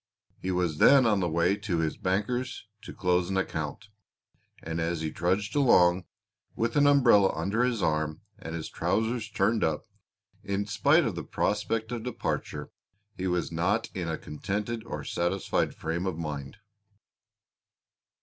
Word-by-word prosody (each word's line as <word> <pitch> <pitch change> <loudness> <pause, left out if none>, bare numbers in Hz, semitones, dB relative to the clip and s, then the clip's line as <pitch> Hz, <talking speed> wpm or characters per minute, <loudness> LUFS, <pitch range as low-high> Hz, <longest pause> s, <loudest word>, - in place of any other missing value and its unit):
He 95 - -4
was 90 -4 0
then 135 -2 +7
on 105 -3 +3
the 90 -2 0
way 85 +4 +2
to 100 -5 -2
his 80 -1 0
banker's 105 +9 -2 0.2
to - - -9
close 90 -1 +1
an 95 - -1
account, 80 +1 -3 0.7
and 80 +1 -3
as 85 0 -1
he 80 -1 -2
trudged 95 +6 -1
along, 90 -10 +4 0.5
with 115 0 -1
an 145 -1 +5
umbrella 120 -9 +5
under 100 +9 0
his 125 -4 0
arm 75 +2 0 0.2
and 80 0 -6
his 80 - -4
trousers 110 0 -1
turned 105 +2 +1
up, 80 -1 0 0.6
in 100 +1 -1
spite 140 - +3
of 110 - -1
the 85 - -5
prospect 110 +2 -1
of 120 -2 -3
departure 125 +1 -4 0.4
he 95 - -3
was 90 -1 -1
not 95 +7 0
in 90 -3 -3
a 80 - -2
contented 105 +8 -4
or - - -5
satisfied 90 +3 -1
frame 85 +4 -3
of 90 -4 -2
mind. 75 -3 -5
95 Hz, 155 wpm, -28 LUFS, 85-110 Hz, 0.7 s, then